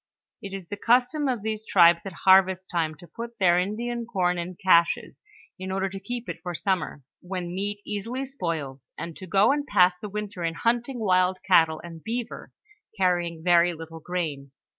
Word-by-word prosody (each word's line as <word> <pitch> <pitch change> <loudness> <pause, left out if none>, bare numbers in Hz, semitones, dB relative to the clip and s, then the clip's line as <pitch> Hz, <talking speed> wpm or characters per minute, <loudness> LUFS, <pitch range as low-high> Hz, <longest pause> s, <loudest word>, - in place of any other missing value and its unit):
It 200 - -7
is 190 -2 -7
the 205 - -6
custom 250 +5 +3
of 245 -5 -1
these 220 0 -3
tribes 170 -5 +5
at 190 - -7
harvest 190 0 +5
time 160 -3 -1
to 175 - -15
put 235 +3 -8
their 175 -2 +4
Indian 230 +5 -3
corn 180 -5 0
in 180 +1 -5
caches, 170 -2 +2 0.4
in 190 0 -5
order 195 0 -1
to 195 0 -7
keep 240 +4 -6
it - - -5
for 175 0 -5
summer, 185 -6 -2 0.2
when 180 -1 -5
meat 205 +2 -3
easily 230 +6 -4
spoils, 165 - -5
and 165 -1 -6
to 185 - -9
go 195 +6 +4
and 290 +1 0
pass 180 0 +5
the 210 - -5
winter 205 -2 -5
in 165 -1 -1
hunting 240 +5 0
wild 185 -4 +2
cattle 165 -4 +4
and 165 -2 -10
beaver, 235 +1 -5 0.5
carrying 175 -3 0
very 175 0 +4
little 165 0 -9
grain. 155 -5 -4
185 Hz, 185 wpm, -26 LUFS, 170-215 Hz, 0.5 s, tribes